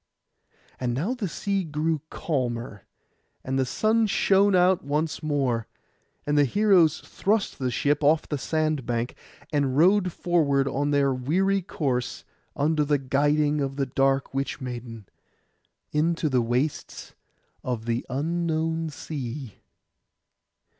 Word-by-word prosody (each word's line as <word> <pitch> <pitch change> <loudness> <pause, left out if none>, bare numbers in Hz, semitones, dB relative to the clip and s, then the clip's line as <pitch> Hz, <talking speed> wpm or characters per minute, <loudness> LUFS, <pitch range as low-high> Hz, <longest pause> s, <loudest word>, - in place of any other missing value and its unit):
And 120 -2 -1
now 175 - -1
the 240 -6 -3
sea 195 +3 -2
grew 155 -1 -1
calmer, 120 - -3 0.6
and 135 +1 -1
the 130 - +1
sun 220 - +2
shone 200 0 +3
out 185 +1 +4
once 150 +3 -1
more, 135 -7 0 0.6
and 145 - 0
the 145 - +5
heroes 180 - +3
thrust 210 +1 -1
the 130 -2 0
ship 145 +5 0
off 150 +2 +3
the 145 - -3
sand 155 -3 -1
bank, 120 0 -1 0.4
and 140 -2 +1
rowed 185 +3 +4
forward 145 -6 +1
on 140 +2 -1
their 140 -2 +2
weary 185 +10 +1
course 130 -8 -2 0.3
under 150 +1 +1
the 145 0 +2
guiding 145 +2 +1
of 135 -1 -2
the 140 -1 0
dark 135 +1 +1
witch 135 +2 -2
maiden, 120 -4 -7 0.9
into 160 +1 +1
the 130 -3 +2
wastes 125 +6 -2 0.5
of 120 -3 -3
the 115 0 -1
unknown 160 +2 -1
sea. 135 -5 -6
145 Hz, 130 wpm, -25 LUFS, 130-165 Hz, 0.9 s, the